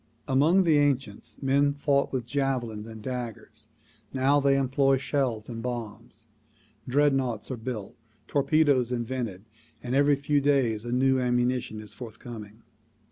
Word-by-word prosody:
Among 155 +8 +4
the 160 -4 +4
ancients 135 -7 -1
men 140 +1 +2
fought 140 -1 +1
with 130 -3 -2
javelins 120 -5 -2
and 110 -1 -10
daggers; 125 -3 -6 0.4
now 135 +2 +3
they 140 -1 +3
employ 135 0 +2
shells 130 -6 -1
and 115 -2 -6
bombs. 115 -2 -6 0.6
Dreadnoughts 135 -4 +1
are - - -2
built, 110 -4 -6 0.3
tor 145 - +1
pedoes 140 -4 +3
invented 120 -5 -3 0.4
and 125 - -3
every 140 +1 +4
few 145 +1 +1
days 130 -6 +1
a 120 - -4
new 130 +1 +3
ammunition 125 -2 0
is 105 -1 -10
forth 115 -3 -9
coming. 110 -3 -10
130 Hz, 140 wpm, -27 LUFS, 115-140 Hz, 0.6 s, Among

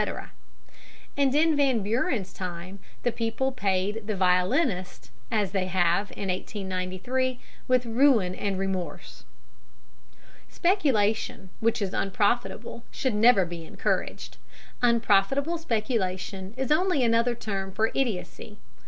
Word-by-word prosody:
And 280 -1 +2
in 315 +1 +4
Van 265 -7 +2
Buren's 215 -2 -1
time 180 +1 -6 0.2
the 245 - +2
people 230 +3 -1
paid 205 -1 -1
the 215 - -1
violinist, 185 - +1 0.2
as 205 -4 0
they 190 -2 0
have 185 +2 +1
in 195 - -4
1893, 190 +7 -2 0.3
with 255 -1 +3
ruin 230 -6 +3
and 195 0 -2
remorse. 190 -2 -4 1.2
Speculation 225 - +1
which 225 -1 +1
is 195 - -3
unprofitable 220 +4 -1
should 260 -4 -1
never 210 -2 +5
be 170 -1 -7
encouraged. - - -3 0.4
Unprofitable 240 +7 +2
speculation 205 - -2
is 265 +2 -2
only 325 -3 +3
another 235 +1 +2
term 195 -4 -4
for 220 +4 +1
idiocy. 215 -3 -3
215 Hz, 110 wpm, -27 LUFS, 190-250 Hz, 1.2 s, never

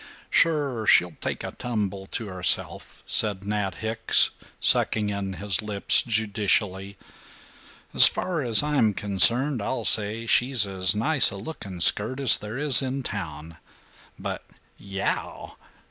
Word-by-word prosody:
"Sure. 140 -9 0
She'll 90 -2 +3
take - - -5
a - - -6
tumble 100 -5 -5
to 115 - -6
herself," 90 -3 -5
said 100 -2 -2
Nat 105 -2 -3
Hicks, 110 0 +2 0.3
sucking 105 -2 +2
in 100 -1 -5
his 100 +2 -1
lips 105 -2 +1
judicially. 100 -3 -2 1.0
"As - - +8
far 175 -4 -4
as 120 -1 +1
I'm 130 -9 0
concerned, 115 +7 +2
I'll 130 +6 -4
say 110 +2 -1
she's 120 -1 +3
as 95 -1 +3
nice 135 +7 +3
a 100 - -9
looking 100 - -9
skirt 110 +9 +4
as 135 -5 +6
there 105 +3 -8
is 145 -1 +5
in 135 0 -5
town. 80 -7 -8 0.6
But - - -7 0.4
yow!" 95 -1 -6
105 Hz, 130 wpm, -23 LUFS, 100-125 Hz, 1.0 s, As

